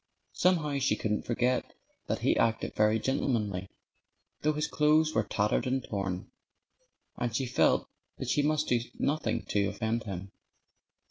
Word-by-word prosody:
Somehow 150 -6 +2
she 135 - +2
couldn't 105 -1 -2
forget 125 +1 0 0.3
that - - -1
he - - +3
acted 115 0 +1
very 105 +1 +3
gentlemanly, 105 -7 -1 0.7
though 155 +1 +2
his 150 0 -1
clothes 155 +1 +3
were 110 - +3
tattered 105 +3 0
and 130 0 0
torn. 95 -3 -4 0.9
And 120 -2 -2
she 130 - 0
felt 125 - +2 0.3
that - - -5
she 145 - +3
must 155 +1 +1
do 120 - +3 0.2
nothing 155 +2 0
to 100 -1 +2
offend 110 +3 -2
him. 95 -1 -6
120 Hz, 145 wpm, -30 LUFS, 105-145 Hz, 0.9 s, he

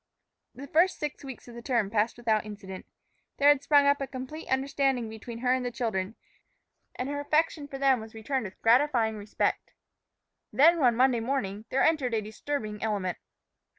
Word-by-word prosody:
The 275 - -8
first 335 +6 +3
six 295 -1 -5
weeks 265 -3 -9
of 240 - -11
the 235 - -9
term 235 -5 0
passed 220 +1 +1
without 225 -3 +1
incident. 195 -3 -9 0.5
There 285 +1 +5
had 290 -2 +5
sprung 285 -1 +4
up 280 0 +3
a 275 - -2
complete 265 +5 -7
understanding 265 -2 0
between 220 +1 -8
her 250 - +4
and 260 -1 0
the 245 - -1
children, 225 -4 -3 0.8
and 250 - -3
her 285 0 -3
affection 300 0 0
for 275 - -7
them 270 -2 +3
was 220 0 -10
returned 240 +2 -2
with 190 - -9
gratifying 235 -2 +3
respect. 205 0 -2 0.8
Then, 330 +5 +5
one 245 -5 +4
Monday 255 0 +3
morning, 225 -4 -3
there 270 - +1
entered 275 -7 +2
a 220 - 0
disturbing 215 -1 -5
element. 200 -5 -2
250 Hz, 180 wpm, -28 LUFS, 220-280 Hz, 0.8 s, There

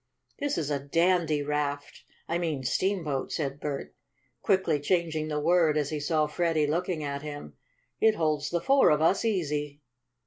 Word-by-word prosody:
"This 285 -1 -1
is 150 -2 -2
a 140 - 0
dandy 165 +1 +1
raft 145 -1 -3 0.3
I 170 +1 -1
mean 155 -6 -2
steamboat," 160 -2 -1
said 140 -3 -3
Bert, 145 -2 -5 0.5
quickly 190 -7 +2
changing 160 0 0
the 150 -1 -2
word 160 -1 +3
as 150 -1 -1
he 155 - -2
saw 155 +1 +1
Freddie 160 0 0
looking 165 +1 -1
at 140 -1 -4
him. 145 - -8 0.5
"It 220 -1 +4
holds 155 -4 0
the 170 -1 -1
four 275 +8 +5
of 150 - +3
us 195 +6 +3
easy." 150 -8 -2
155 Hz, 165 wpm, -28 LUFS, 145-175 Hz, 0.5 s, four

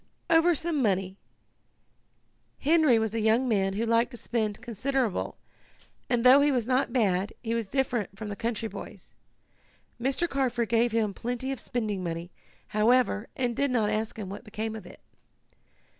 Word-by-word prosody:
"Over 330 +1 +5
some 315 -1 -1
money. 190 -4 0 1.4
Henry 305 -4 +4
was 220 -1 -1
a 230 - -1
young 220 +4 +3
man 195 -4 +1
who 220 +4 -1
liked 230 +1 +2
to 245 - -9
spend 215 -3 -2
considerable, 240 -1 -2 0.7
and 240 -2 +1
though 260 +3 +8
he 290 0 +4
was 245 -4 0
not 255 +2 +1
bad 200 -5 +1
he 230 -1 -1
was 230 -3 -1
different 240 -5 -1
from 220 - -6
the 205 - -4
country 230 +1 -2
boys. - - -10 0.9
Mr. 275 +7 0
Carford 250 -6 -1
gave 235 +1 +3
him 220 -3 0
plenty 245 +5 -3
of 270 - -4
spending 210 -6 -3
money, 170 +1 -4 0.4
however, 220 0 +2
and 245 -2 -1
did 280 +3 +1
not 225 -4 +1
ask 220 +1 -2
him 210 -3 -5
what 195 +4 -7
became 220 0 -4
of 205 -5 -9
it. - - -14
230 Hz, 165 wpm, -28 LUFS, 210-255 Hz, 1.4 s, though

